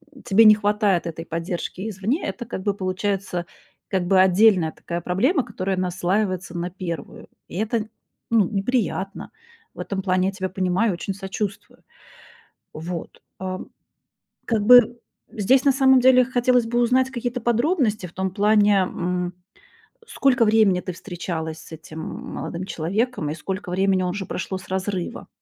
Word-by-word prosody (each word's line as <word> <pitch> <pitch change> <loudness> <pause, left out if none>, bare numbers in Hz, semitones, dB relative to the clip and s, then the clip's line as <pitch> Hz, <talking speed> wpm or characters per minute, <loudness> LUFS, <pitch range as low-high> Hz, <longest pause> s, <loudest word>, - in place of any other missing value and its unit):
м, 260 - -14
тебе 225 -1 +5
не 215 0 +9
хватает 205 -4 +1
этой 165 0 -6
поддержки 175 +5 -4
извне. 215 - -2
Это 240 - -5
как 200 -4 -5
бы 205 - +1
получается 185 -1 -2 0.4
как 185 -2 -1
бы 190 0 +4
отдельная 190 -3 +4
такая 170 0 -5
проблема, 245 - +1
которая 195 -4 -3
наслаивается 185 0 -1
на 175 +1 -2
первую. 170 -5 -7 0.2
И - - -8
это, 220 0 -1 0.4
ну, 215 -6 +4
неприятно. 195 -2 -2 0.4
В - - -16
этом 195 -1 -3
плане 185 -1 +1
я - - -4
тебя 190 -1 -3
понимаю, 190 +2 +1
очень 190 +3 -4
сочувствую. 200 +1 -6 0.9
Вот. 170 +2 -7 0.2
Ам, 185 0 -5 0.8
как 220 -3 0
бы 240 0 +7 0.3
здесь, 250 +4 +3
на 280 - +5
самом 265 -1 +5
деле, 255 -1 +6
хотелось 245 -1 +2
бы 240 +1 0
узнать 255 +2 +3
какие-то 245 0 -3
подробности 240 - +1
в 170 - -17
том 190 0 -2
плане, 205 0 +4
м, 180 0 -2 0.7
сколько 260 - +2
времени 210 -4 +4
ты 185 - -5
встречалась 165 -3 -5
с - - -14
этим 160 0 -9
молодым 175 +2 -6
человеком 195 +1 -2
и 155 - -3
сколько 185 +3 -5
времени 190 0 +2
уже 185 +2 -3
прошло 190 +1 -4
с 185 - -12
разрыва? 190 -1 -3
195 Hz, 150 wpm, -23 LUFS, 180-225 Hz, 0.9 s, не